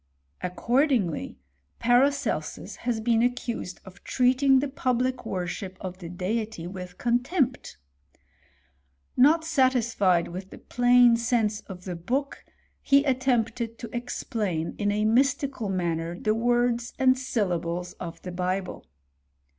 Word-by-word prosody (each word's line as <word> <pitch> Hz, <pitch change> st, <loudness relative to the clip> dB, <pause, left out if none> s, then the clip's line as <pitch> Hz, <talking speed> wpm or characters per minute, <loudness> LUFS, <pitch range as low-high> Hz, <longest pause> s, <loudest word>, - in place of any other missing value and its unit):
Accordingly, 235 Hz, -, 0 dB, 0.4 s
Paracelsus 275 Hz, +4 st, +1 dB
has 240 Hz, -2 st, -2 dB
been 225 Hz, 0 st, +2 dB
accused 240 Hz, -6 st, -2 dB
of 190 Hz, +1 st, -14 dB
treating 260 Hz, +2 st, +3 dB
the 280 Hz, +2 st, +1 dB
public 255 Hz, -1 st, -1 dB
worship 185 Hz, +1 st, -4 dB
of 185 Hz, -1 st, -7 dB
the 170 Hz, -3 st, -8 dB
Deity 195 Hz, +1 st, -3 dB
with 180 Hz, 0 st, -8 dB
contempt. 250 Hz, -, 0 dB, 1.4 s
Not 315 Hz, +5 st, +5 dB
satisfied 235 Hz, -, +2 dB
with 185 Hz, +2 st, -7 dB
the -, -, -11 dB
plain 245 Hz, -1 st, +4 dB
sense 230 Hz, -3 st, 0 dB
of 185 Hz, -2 st, -9 dB
the 180 Hz, -2 st, -5 dB
book, 260 Hz, +12 st, -3 dB, 0.4 s
he 280 Hz, 0 st, +4 dB
attempted 245 Hz, -4 st, 0 dB
to 235 Hz, -, -7 dB
ex^ 240 Hz, +2 st, -5 dB
plain 185 Hz, -10 st, -2 dB
in 205 Hz, -1 st, +1 dB
a 210 Hz, +1 st, 0 dB
mystical 255 Hz, 0 st, +1 dB
manner 170 Hz, -2 st, -2 dB
the 215 Hz, -, +1 dB
words 240 Hz, +1 st, +1 dB
and 260 Hz, -1 st, +4 dB
syllables 180 Hz, -8 st, -2 dB
of 170 Hz, -2 st, -7 dB
the 180 Hz, -, -5 dB
Bible. 185 Hz, +1 st, -3 dB
230 Hz, 125 wpm, -26 LUFS, 185-255 Hz, 1.4 s, Not